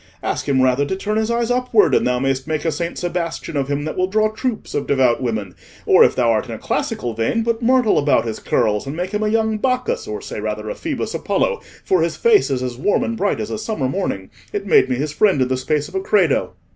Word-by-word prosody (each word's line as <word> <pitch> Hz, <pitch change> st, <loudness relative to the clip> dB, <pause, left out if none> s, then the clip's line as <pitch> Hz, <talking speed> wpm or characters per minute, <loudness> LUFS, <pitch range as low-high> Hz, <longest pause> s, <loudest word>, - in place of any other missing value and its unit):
Ask -, -, -2 dB
him 130 Hz, -2 st, +3 dB
rather 130 Hz, +2 st, +3 dB
to 165 Hz, +7 st, -2 dB
turn 210 Hz, +3 st, -2 dB
his 220 Hz, 0 st, 0 dB
eyes 235 Hz, 0 st, 0 dB
upward, 250 Hz, -3 st, +3 dB
and -, -, +3 dB
thou 125 Hz, 0 st, +1 dB
mayst 135 Hz, +1 st, -1 dB
make 155 Hz, 0 st, -2 dB
a 165 Hz, -, +2 dB
Saint 170 Hz, +1 st, -4 dB
Sebastian 175 Hz, -2 st, -3 dB
of 140 Hz, -2 st, 0 dB
him 145 Hz, +1 st, -2 dB
that 155 Hz, -, -4 dB
will 185 Hz, 0 st, +1 dB
draw 215 Hz, +2 st, +1 dB
troops 240 Hz, +1 st, -4 dB
of -, -, -2 dB
devout 130 Hz, -4 st, +2 dB
women; 110 Hz, -7 st, -3 dB, 0.3 s
or, -, -, +6 dB
if -, -, +3 dB
thou 120 Hz, -2 st, +3 dB
art 110 Hz, -, 0 dB
in -, -, -5 dB
a -, -, -7 dB
classical 120 Hz, -1 st, -2 dB
vein, 115 Hz, -, 0 dB
put 230 Hz, 0 st, -1 dB
myrtle 250 Hz, -1 st, +3 dB
about 140 Hz, -5 st, +2 dB
his 110 Hz, -2 st, -4 dB
curls 105 Hz, +3 st, 0 dB
and 140 Hz, -, -4 dB
make 180 Hz, +3 st, -3 dB
him 210 Hz, 0 st, -1 dB
a 215 Hz, -, +1 dB
young 220 Hz, -1 st, +1 dB
Bacchus, 400 Hz, -, -1 dB
or 425 Hz, 0 st, -4 dB
say -, -, -7 dB
rather -, -, -3 dB
a -, -, -2 dB
Phoebus -, -, -4 dB
Apollo, 480 Hz, -2 st, 0 dB, 0.2 s
for 185 Hz, -3 st, +2 dB
his 165 Hz, +1 st, 0 dB
face 460 Hz, -3 st, +4 dB
is 130 Hz, -2 st, -1 dB
as 125 Hz, -1 st, -4 dB
warm 205 Hz, -, +1 dB
and 235 Hz, -2 st, -2 dB
bright 205 Hz, -2 st, 0 dB
as 210 Hz, -, -4 dB
a -, -, -3 dB
summer 215 Hz, -, -2 dB
morning; 130 Hz, -, -3 dB, 0.2 s
it 200 Hz, -1 st, -3 dB
made 185 Hz, -, +4 dB
me 130 Hz, -, +1 dB
his 145 Hz, +3 st, -3 dB
friend 195 Hz, -4 st, +3 dB
in 130 Hz, -1 st, +1 dB
the 130 Hz, -, +1 dB
space 145 Hz, +3 st, -1 dB
of -, -, -15 dB
a 385 Hz, -, 0 dB
'credo. 425 Hz, +2 st, +2 dB
175 Hz, 260 wpm, -20 LUFS, -, 0.3 s, or